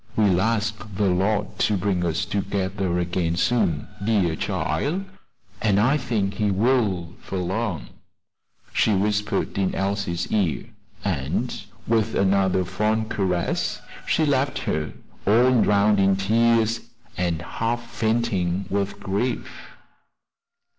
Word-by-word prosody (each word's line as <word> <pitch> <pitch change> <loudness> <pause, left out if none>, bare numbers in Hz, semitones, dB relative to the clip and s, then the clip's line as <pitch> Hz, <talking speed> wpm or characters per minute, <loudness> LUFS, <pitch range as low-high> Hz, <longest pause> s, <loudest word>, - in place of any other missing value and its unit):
"We'll 100 -5 +3
ask 110 0 0 0.2
de 100 +1 +1
Lord 100 +3 0
to 105 - +2
bring 90 -1 0
us 85 -2 0
together 95 -2 -1
again 90 -1 0
soon, 85 -6 +1 0.2
dear 100 -7 +2
chile, 175 - -1 0.6
an' 105 -3 +3
I 125 +8 +4
think 110 -7 -1
he 105 +1 0
will 100 -5 +1
'fore 95 - -5
long," 95 0 -2 0.8
she 110 - +3
whispered 105 0 0
in 95 -1 0
Elsie's 95 -3 -2
ear; 95 - +1 0.4
and 90 - -1 0.3
with 110 -1 +1
another 95 -1 +2
fond 110 +4 0
caress 90 -3 0 0.3
she 160 - +2
left 140 -1 +1
her 75 0 -1 0.4
all 120 +3 +5
drowned 105 0 +4
in 95 0 +4
tears, 115 +3 +2 0.4
and 85 -3 -1
half 115 +5 -2
fainting 100 -5 0
with 100 0 -1
grief. 105 +6 -3
100 Hz, 120 wpm, -24 LUFS, 95-110 Hz, 0.8 s, all